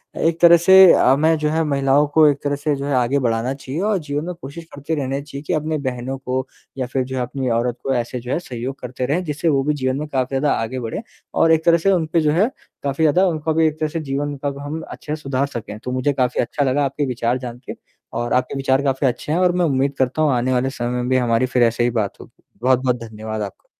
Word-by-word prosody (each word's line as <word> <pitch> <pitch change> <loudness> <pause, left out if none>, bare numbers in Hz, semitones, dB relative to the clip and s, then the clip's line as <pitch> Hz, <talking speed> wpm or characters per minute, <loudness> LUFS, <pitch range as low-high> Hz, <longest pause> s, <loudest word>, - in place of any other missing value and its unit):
अ, - - -7
एक 165 0 +1
तरह 170 0 +8
से 190 +1 +8
अ, 130 - +4
मैं 160 +2 +3
जो 150 0 0
है 160 +1 +1
महिलाओं 140 0 +2
को 155 +1 +5
एक 145 -1 +1
तरह 145 0 0
से 145 +1 -1
जो 140 0 -5
है 145 - -1
आगे 125 +3 +2
बढ़ाना 120 +1 0
चाहिए 135 +4 -5
और 210 0 +1
जीवन 150 0 -4
में 180 - -4
कोशिश 145 +4 -8
करते 145 +3 -3
रहना 135 -1 -2
चाहिए 140 -1 -8
कि - - 0
अपने 155 0 -1
बहनों 130 +1 -3
को 130 0 -3 0.3
या 130 - -1
फिर 130 +1 -1
जो 130 +1 -6
है, - - 0
अपनी 130 +1 -3
औरत 120 +1 0
को 135 - 0
ऐसे 120 +1 -2
जो 125 +2 -7
है 165 - +1
सहयोग 130 -3 -6
करते 125 0 -4
रहें, 155 +7 0
जिससे 155 0 -3
वो 135 -2 +2
भी 150 +2 +1
जीवन 130 -2 -1
में 150 - -4
काफ़ी 130 -2 -2
ज़्यादा 145 +1 +1
आगे 130 +3 -3
बढ़े 115 - -4 0.3
और 165 - +3
एक 160 +1 +2
तरह 170 0 +6
से 195 +4 +2
उन 175 -4 +2
पे 165 - +4
जो 150 -1 +2
है 185 +8 +3 0.4
काफ़ी 140 +3 -1
ज़्यादा 175 +5 +4
उनका 160 -2 -1
भी 160 +1 +3
एक 155 0 -3
तरह 155 -1 0
से 165 - -3
जीवन 145 0 -3
कब 140 -1 -2
हम 145 +3 -5
अच्छे 150 0 -5
से 155 - -12
सुधार 135 0 0
सकें। 115 -5 -7
तो 125 - -4
मुझे 130 +3 0
काफ़ी 125 -2 +1
अच्छा 145 +4 -1
लगा 140 +2 +1
आपके 140 +2 -2
विचार 125 -1 -1
जान 120 -2 -7
के - - -5 0.4
और 120 0 -1
आपके 125 +2 0
विचार 135 0 +2
काफ़ी 135 0 +1
अच्छे 130 +4 -3
हैं 170 - +1
और 180 -1 +4
मैं 180 -1 +2
उम्मीद 140 -1 +1
करता 130 +4 0
हूँ 150 -2 +3
आने 125 +1 +1
वाले 130 +1 +1
समय 120 -3 -4
में 125 0 -2
भी 130 - +3
हमारी 120 0 +2
फिर 125 - +5
ऐसे 115 +1 +2
ही 120 - +2
बात 105 -3 -2
होगी, - - -17 0.2
बहुत-बहुत 130 0 +2
धन्यवाद 110 -1 -6
आपका। 100 -2 -7
135 Hz, 270 wpm, -20 LUFS, 125-155 Hz, 0.4 s, तरह